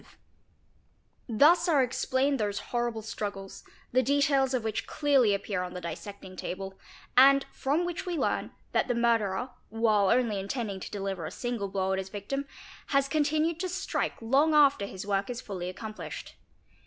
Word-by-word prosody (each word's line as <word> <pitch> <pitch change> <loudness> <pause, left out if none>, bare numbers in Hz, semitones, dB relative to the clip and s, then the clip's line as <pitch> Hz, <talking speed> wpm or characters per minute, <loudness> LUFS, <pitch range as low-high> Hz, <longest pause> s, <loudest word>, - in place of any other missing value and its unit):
ie - - -22 1.2
Thus 325 - +5
are 290 -5 +5
explained 260 +2 0
those 205 -1 -1 0.2
horrible 240 -2 -1
struggles 200 -3 -6 0.3
the 255 - +4
details 275 0 +2
of 245 - -1
which 220 -1 -2
clearly 280 -7 +3
appear 200 -1 -3
upon 180 0 -5
the 180 - -5
dissecting 185 +3 -7
table, 190 +2 -5 0.4
and 275 +2 +7
from 295 +6 0
which 355 +2 -4
we 350 -2 -1
learn - - 0 0.2
that - - +1
the 245 - 0
murderer, 235 -1 +1 0.2
while 215 -3 +2
only 235 -5 +2
intending 200 0 -3
to - - -7
deliver 195 -4 -4
a - - -4
single 240 -5 -3
blow 190 -1 -1
at 190 - 0
his 190 0 -5
victim, 245 +8 -4 0.4
has 275 -1 +2
continued 310 +3 +1
to 370 +1 -2
strike 375 +2 -2
long 280 +7 +3
after 280 -8 +5
his 190 +1 -7
work 200 +1 0
is 245 -1 -4
fully 185 -6 -5
accomplished. 215 +3 -7
235 Hz, 165 wpm, -29 LUFS, 200-275 Hz, 1.2 s, and